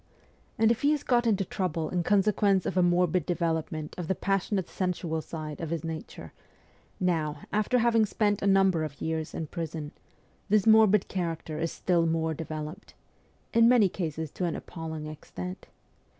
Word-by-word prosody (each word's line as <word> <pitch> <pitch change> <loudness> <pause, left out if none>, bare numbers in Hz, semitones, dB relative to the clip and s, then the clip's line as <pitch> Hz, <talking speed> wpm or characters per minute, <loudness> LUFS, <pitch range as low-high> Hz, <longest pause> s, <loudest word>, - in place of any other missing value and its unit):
And 225 0 +4
if 235 - -1
he 285 - +3
has 295 - -2
got 240 -2 +2
into 200 -3 +2
trouble 165 -4 -2
in 180 - +1
consequence 200 0 +2
of - - -2
a 185 - +4
morbid 175 -1 +2
development 160 -2 -2
of 170 - -4
the 190 - 0
passionate 195 0 -1
sensual 175 -3 -2
side 155 -1 -7
of 165 - -4
his 165 -2 -3
nature, 160 -1 -7 0.7
now, 155 -5 0
after 215 +4 +2
having 230 -2 +3
spent 205 -1 0
a 200 - +1
number 195 -4 +4
of 145 -2 -6
years 160 0 -3
in 160 - -3
prison, 160 -2 -5 0.6
this 210 -1 +3
morbid 220 -3 +6
character 165 -4 -3
is 165 0 -1
still 170 -2 +1
more 160 0 0
developed 155 +4 -7 0.6
in 230 0 +6
many 235 -6 +5
cases 160 -4 -4
to 180 - -3
an 170 - -1
appalling 160 -2 -6
extent. 170 +4 -7
175 Hz, 165 wpm, -28 LUFS, 160-200 Hz, 0.7 s, morbid